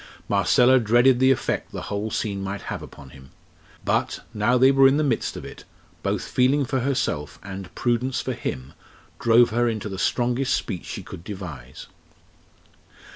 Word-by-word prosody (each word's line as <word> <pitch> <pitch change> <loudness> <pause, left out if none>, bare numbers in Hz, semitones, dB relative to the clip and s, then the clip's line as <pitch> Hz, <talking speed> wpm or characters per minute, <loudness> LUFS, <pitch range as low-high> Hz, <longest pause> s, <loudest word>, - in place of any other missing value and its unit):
Marcella 130 +1 +4
dreaded 120 +3 +4
the 130 0 +5
effect 135 - 0
the - - -6
whole 105 +2 -3
scene 100 -2 -2
might 100 +1 -5
have - - -6
upon 70 -3 -12
him; 65 -1 -15 0.6
but, - - 0
now 110 +4 +2
they 130 +2 +6
were 135 0 +6
in 135 +2 +3
the 155 - +1
midst 140 - -1
of - - -8
it, - - -10 0.4
both - - -1
feeling 135 +3 +2
for 130 +1 -1
herself 120 - -2
and 95 -2 -8
prudence 125 +2 0
for 130 - -3
him 65 - -5 0.5
drove 120 0 +5
her 120 +1 +2
into 110 -2 -4
the 95 -1 -6
strongest 125 +4 +1
speech 90 - -4
she - - -6
could 85 - -10
devise. 85 - -8
120 Hz, 170 wpm, -24 LUFS, 95-130 Hz, 0.6 s, they